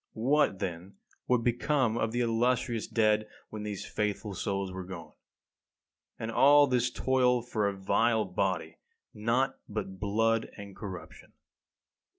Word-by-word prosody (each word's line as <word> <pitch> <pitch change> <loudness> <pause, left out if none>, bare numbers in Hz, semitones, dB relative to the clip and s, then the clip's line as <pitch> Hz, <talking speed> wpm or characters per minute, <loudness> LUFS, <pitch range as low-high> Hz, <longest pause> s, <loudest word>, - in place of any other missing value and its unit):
What, 130 -2 +2
then, 95 0 -5 0.3
would 125 -2 +2
become 120 0 +1
of 115 -1 0
the 120 +1 0
illustrious 120 0 0
dead 110 -1 +2 0.2
when 110 - -6
these 105 -2 -5
faithful 105 -1 -2
souls 100 -1 -2
were 95 0 -6
gone? 85 -4 -9 1.0
And 115 - -4
all 145 +4 +6
this 125 -3 +1
toil 125 -2 +2
for 110 -4 -1
a 100 -1 -3
vile 110 +3 +2
body, 90 -2 -2 0.3
naught 125 +5 0
but 95 -3 -5
blood 115 +2 +1
and 100 -2 -9
corruption! 95 -3 -9
110 Hz, 135 wpm, -30 LUFS, 100-120 Hz, 1.0 s, all